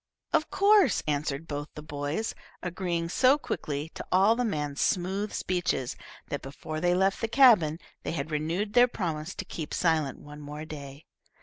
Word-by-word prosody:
"Of 310 - +2
course," 400 - +4
answered 150 +1 -2
both 145 0 -4
the 150 - -7
boys, 150 +7 -3 0.3
agreeing 175 -2 -2
so 255 +10 +4
quickly 150 - -4
to - - -6
all 195 +5 +5
the 245 - 0
man's 150 -10 -2
smooth 190 +3 0
speeches 175 -8 -1 0.3
that, 145 - -3
before 155 +3 -6
they 175 0 +3
left 195 +1 +2
the 225 - +1
cabin, 220 - +6 0.2
they - - -3
had 155 -1 -3
renewed 165 +8 -1
their 245 0 +7
promise 170 -7 -4
to 205 - -5
keep 160 -4 -5
silent 155 -6 +1
one 150 0 -11
more 150 +1 -7
day. 145 -1 -9
165 Hz, 170 wpm, -28 LUFS, 150-200 Hz, 0.3 s, their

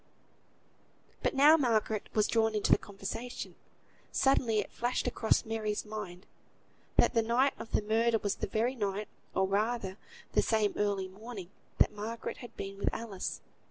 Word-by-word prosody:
But - - 0
now 295 +4 +8
Margaret 220 -6 +1
was 215 -1 +4
drawn 225 -1 +2
into 210 - +1
the - - +7
conversation. 210 +5 -6 0.6
Suddenly 260 -5 +3
it 210 - -1
flashed 245 +2 -1
across 220 - +2
Mary's 220 -1 -2
mind, 210 -4 -6 0.7
that - - +5
the 230 - +4
night 240 +5 +3
of 225 - -8
the - - +1
murder 225 +2 +3
was 205 -2 -1
the - - -2
very 230 +4 +1
night, 205 -3 -2 0.3
or 190 - +3
rather 205 -1 0 0.3
the - - +4
same 215 -2 +2
early 200 -2 0
morning, 200 -1 -9 0.3
that - - +4
Margaret 220 +2 -5
had 240 - -11
been 195 0 -6
with - - +2
Alice. 215 -5 -4
220 Hz, 160 wpm, -32 LUFS, 205-235 Hz, 0.7 s, now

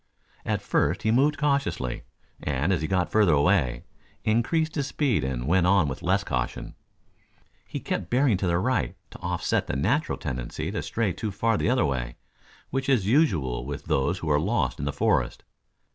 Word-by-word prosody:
At - - -1
first - - +1
he 110 - +2
moved 145 +5 +3
cautiously 135 - 0 0.4
and 75 +6 0
as 85 - 0
he 80 - -1
got 90 -1 0
further 105 -7 +4
away, 70 -5 +2 0.4
increased 155 +9 +1
his 140 -3 -1
speed 135 - 0
and 65 -2 -2
went 90 +4 +3
on 95 -4 +4
with 65 - -5
less 95 +3 +1
caution. 65 -6 -3 0.9
He - - -5
kept - - -3
bearing 125 -4 +3
to 95 - -1
the 85 0 +2
right 125 +8 0
to - - -11
offset 90 0 -1
the - - -2
natural - - 0
tendency 60 -2 -4
to - - -2
stray 110 -5 -1
too 110 - -4
far 115 +3 +1
the 105 - 0
other 130 -6 +3
way, 60 -4 -2 0.6
which 135 +1 -1
is 125 -8 +3
usual 85 - +2
with 70 +2 -6
those 70 +7 +1
who 85 -3 -4
are 75 - +4
lost 105 +10 0
in 70 - -3
the 70 - 0
forest. - - 0
95 Hz, 185 wpm, -26 LUFS, 70-115 Hz, 0.9 s, further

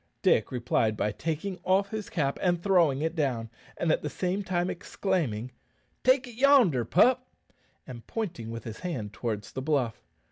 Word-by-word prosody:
Dick - - +3
replied 115 -3 0
by 105 - 0
taking 165 - -3
off 195 +2 +2
his 215 -2 -4
cap 140 -5 -1
and 175 -2 +2
throwing 170 -8 +3
it 160 +1 0
down, 125 -8 -1 0.3
at 160 -2 +1
the 150 - -3
same 185 +5 -2
time 180 -1 0
exclaiming, 165 - -2 0.5
"Take 260 +1 +4
it 245 - -10
yonder, 245 - +5
pup," 250 - +4 0.6
and 120 -3 -10
pointing 170 - -4
with 115 -1 -6
his 110 -2 -7
hand 125 - -4
towards 110 -4 -4
the 130 - -4
bluff. 130 -6 0
160 Hz, 165 wpm, -28 LUFS, 120-190 Hz, 0.6 s, yonder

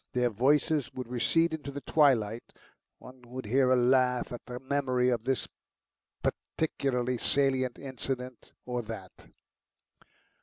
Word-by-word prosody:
Their 125 -1 +2
voices 145 +5 +2
would 130 -2 -5
recede 160 +7 +2
into 150 -3 -5
the 140 0 -6
twilight; 120 -7 +2 0.4
one 130 0 -14
would 125 +1 -8
hear 130 +4 +3
a 130 - +5
laugh 125 0 +3
at 120 - -7
the 125 0 -6
memory 130 -2 +1
of 120 -2 -1
this 135 -1 0 0.8
particularly 125 -5 -1
salient 130 -2 +1
incident 130 -2 -5
or 125 -1 -2
that. 110 -5 -9
125 Hz, 125 wpm, -30 LUFS, 120-135 Hz, 0.8 s, a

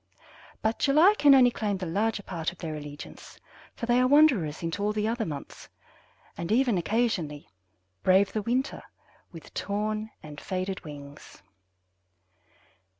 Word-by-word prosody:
But 220 +1 0
July 310 +8 +5
can 285 -2 +7
only 250 -2 +6
claim 210 -4 -2
the 185 - -5
larger 205 +5 -1
part 170 -4 -3
of 180 - -17
their 160 -3 -5
allegiance, 145 -1 -10 0.4
for - - -4
they 240 +1 +3
are 255 - +4
wanderers 255 - +4
into 165 +4 -3
all 210 +1 0
the 210 0 -1
other 225 -2 -1
months, 145 -3 -8 0.7
and 170 +2 -5
even 240 -1 +3
occasionally 175 -7 -1 0.5
brave 190 +1 +3
the 215 - -1
winter 250 +6 -1 0.5
with 165 -2 -12
torn 215 +2 -2
and 150 -1 -10
faded 185 0 -4
wings." 145 -7 -11
205 Hz, 145 wpm, -27 LUFS, 165-235 Hz, 0.7 s, can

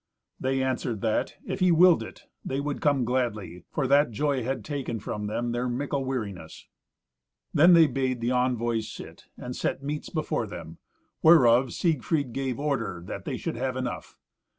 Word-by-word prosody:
They 130 0 0
answered 125 -4 -2
that, 110 -1 0
if - - -4
he 185 -1 +4
willed 170 +1 +6
it, - - -9 0.2
they 135 - -2
would 145 0 -3
come 140 -4 +2
gladly, 110 -8 -2
for 145 - -1
that 140 +2 +4
joy 140 +4 0
had 125 -3 -3
taken 135 -5 -3
from 105 +1 -4
them 120 +3 -2
their 120 +1 -1
mickle 140 +2 -2
weariness. 100 -11 -5 0.9
Then 170 +4 +7
they 165 -1 +8
bade 130 -2 -1
the 120 +2 -1
envoys 120 -3 0
sit, - - -11
and 125 0 -6
set 135 - -2
meats 150 +1 -4
before 155 -8 -2
them, 85 -4 -9 0.4
whereof 130 -6 +6
Siegfried 150 -5 0
gave 135 -1 -2
order 115 - -2 0.2
they - - -3
should - - -4
have - - -2
enough. - - -5
130 Hz, 165 wpm, -27 LUFS, 115-145 Hz, 0.9 s, they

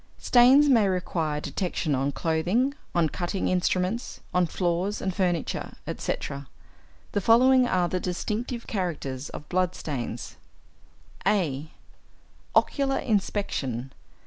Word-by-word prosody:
Stains 260 +4 +6
may 230 -7 +5
require 170 -5 -1
detection 170 -2 -2
on 135 +1 +1
clothing, 170 - +1 0.2
on 170 -2 +4
cutting 175 +4 -2
instruments, 185 +4 0
on 180 -1 +3
floors 180 +4 -1
and 190 - -2
furniture, 175 -4 -1
etc. 140 0 -4 0.6
The 205 - 0
following 250 +4 +5
are 180 -5 +2
the 185 - -1
distinctive 220 +7 -3
characters 150 - -3
of 150 - -9
blood 185 0 0
stains: 120 -5 -5 0.9
(a) 155 -7 0 0.9
=Ocular 275 -2 +2
Inspection. 150 - -1
180 Hz, 110 wpm, -26 LUFS, 155-210 Hz, 0.9 s, Stains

